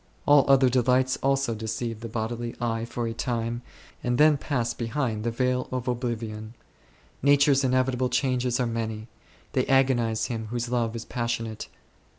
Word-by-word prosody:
All 145 -2 +6
other 135 -1 +6
delights 130 +1 +2
also 135 -3 +1
deceive 110 +1 -4
the 115 0 -7
bodily 115 +1 -3
eye 115 -1 -1
for 120 0 -4
a 115 - -2
time, 115 0 -2 0.4
and 120 0 0
then 150 +1 +6
pass 125 -4 -1
behind 115 -2 -2
the 120 - 0
veil 125 +2 0
of 130 -1 -3
oblivion. 115 -3 -3 0.7
Nature's 140 0 +4
inevitable 130 -1 +1
changes 125 -1 0
are 125 - +2
many; 110 -1 -4 0.4
they - - +1
agonize 125 -5 +2
him 115 -3 -4
whose 120 +1 -3
love 120 -2 0
is 115 - -5
passionate. 115 -3 -3
120 Hz, 155 wpm, -26 LUFS, 115-130 Hz, 0.7 s, All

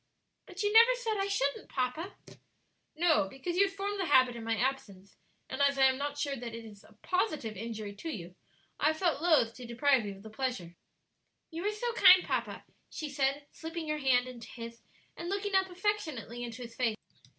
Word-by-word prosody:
"But 370 +2 -5
you 415 0 +1
never 465 +3 +8
said 455 -4 -2
I 390 - 0
shouldn't, 280 -8 -1
papa." 285 +9 -2 0.8
"No; 315 - +3
because 270 - -5
you 395 +2 +5
had 390 - -9
formed 400 +1 -2
the 375 - 0
habit 255 -4 +5
in 230 - -7
my 225 0 0
absence, 200 -7 -3 0.3
and, 265 - -4
as 280 0 +3
I 270 - +4
am 260 0 +3
not 285 0 -3
sure 285 -1 -1
that 235 -2 -6
it 230 0 -8
is 205 -2 -13
a - - -19
positive 310 - -1
injury 215 -1 -5
to 325 - -5
you, 180 - -6 0.5
I - - +3
have 315 0 +1
felt 335 -4 +1
loath 310 -10 +4
to 250 -2 -8
deprive 245 -1 +2
you 200 - -5
of 195 - -15
the 220 - -10
pleasure." 215 -8 -3 0.8
"You 330 +2 -5
are - - +2
so 465 +3 -3
kind, 370 -4 +8
papa," - - -3 0.2
she 310 - -5
said, 275 +1 0
slipping 325 -1 -6
her 305 0 -1
hand 255 -3 +3
into 240 -3 -9
his 230 -1 -9 0.3
and 345 - -6
looking 400 +1 -2
up 380 0 +3
affectionately 340 - -2
into 240 +1 -6
his 230 -1 -9
face. 230 -4 0
280 Hz, 205 wpm, -31 LUFS, 235-360 Hz, 0.8 s, never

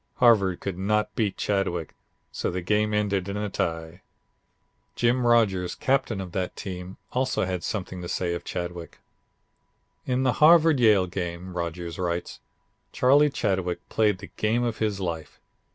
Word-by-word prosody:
Harvard 100 -7 +4
could 95 -2 -5
not 105 +2 0
beat 105 -4 0
Chadwick, 95 -5 -1 0.4
so - - -2
the 90 - -3
game 105 +3 +1
ended 100 -2 0
in 100 - -3
a 105 -1 -3
tie." 80 +1 -3 0.9
Jim 120 +1 +2
Rodgers, 95 -7 +2
captain 130 -6 0
of 95 -2 -6
that 90 0 -3
team, 90 -1 -7
also 130 -5 0
has 90 -1 -3
something 95 -3 -4
to 85 - -6
say 90 -2 -1
of 85 - -5
Chadwick. 85 -1 -6 1.1
"In 130 +1 +1
the 130 -2 +2
Harvard 160 -2 +7
Yale 105 -5 +5
game," 90 0 -5
Rodgers 85 0 -4
writes, 85 -1 -3 0.5
"Charlie 145 +4 +4
Chadwick 95 -9 -2
played 105 -3 +2
the 100 +2 -11
game 115 +3 +1
of 115 -3 -2
his 105 -3 -1
life. 85 -4 -5
95 Hz, 150 wpm, -26 LUFS, 90-110 Hz, 1.1 s, Harvard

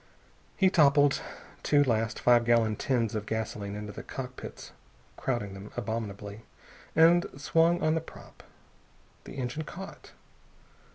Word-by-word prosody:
He 190 -1 +4
toppled 145 -3 +5 0.4
two 145 -1 +4
last 115 -3 0
five 120 -1 +5
gallon 115 -2 +3
tins 115 -2 0
of 105 -1 -3
gasoline 105 -2 -3
into 105 0 -6
the - - -8
cockpits 130 -1 -8 0.4
crowding 120 -7 -2
them 95 +1 -9
abominably 105 -2 -4 0.5
and 170 +2 +6
swung 165 +4 +3
on 155 - +3
the 160 - 0
prop. 165 - -14 0.8
The - - -9
engine 130 +3 -3
caught. 190 +5 -10
120 Hz, 125 wpm, -29 LUFS, 110-150 Hz, 0.8 s, and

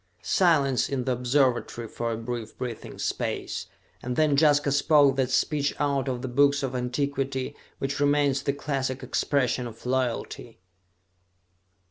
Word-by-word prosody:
Silence 145 -8 +2
in 135 -2 -1
the 130 - -1
observatory 125 -2 +1
for 115 +1 -3
a 110 - -2
brief 115 -1 -6
breathing 120 -3 -6
space, - - -3 0.3
and 125 0 -3
then 155 -1 +3
Jaska 145 -1 +4
spoke 145 -1 +4
that 130 -2 +1
speech 145 +2 +1
out 140 -2 0
of 125 -1 -3
the - - -2
books 140 +3 +3
of 130 -1 -2
antiquity, 135 +1 -2 0.2
which 135 +1 -3
remains 145 -1 +2
the 140 - 0
classic 135 -2 -3
expression 125 -1 0
of 115 +1 -12
loyalty. 125 -2 -2
135 Hz, 140 wpm, -26 LUFS, 125-145 Hz, 0.3 s, Jaska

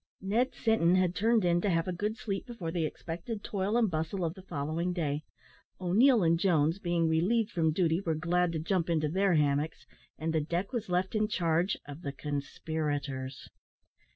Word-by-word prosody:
Ned 225 +7 0
Sinton 205 -6 +3
had 185 -2 +2
turned 220 0 +2
in 175 0 +3
to 205 - +1
have 165 -1 +1
a 185 - -1
good 210 +5 -2
sleep 200 -1 -4
before 200 -9 -5
the 165 -2 0
expected 175 +8 -6
toil 200 +3 -1
and 225 -5 +2
bustle 165 +3 -1
of 160 - -2
the 190 - -12
following 170 +1 -2
day; 150 -4 -1 0.6
O'Neil 215 +6 +4
and 165 0 +3
Jones, 165 -2 +2
being 175 -3 +1
relieved 200 +8 +2
from 160 -5 +2
duty, 165 +1 +1
were 165 -5 -1
glad 175 +2 +1
to - - -1
jump 170 +1 0
into 155 -2 +1
their 190 +2 +2
hammocks; 150 +1 0 0.3
and 160 +1 -2
the 160 - +2
deck 175 - -2
was 230 -5 -3
left 180 +1 0
in 215 -1 +2
charge 170 -2 +1
of 145 +3 -8
the 140 - -4
conspirators. 145 -2 -4
175 Hz, 185 wpm, -30 LUFS, 160-195 Hz, 0.6 s, O'Neil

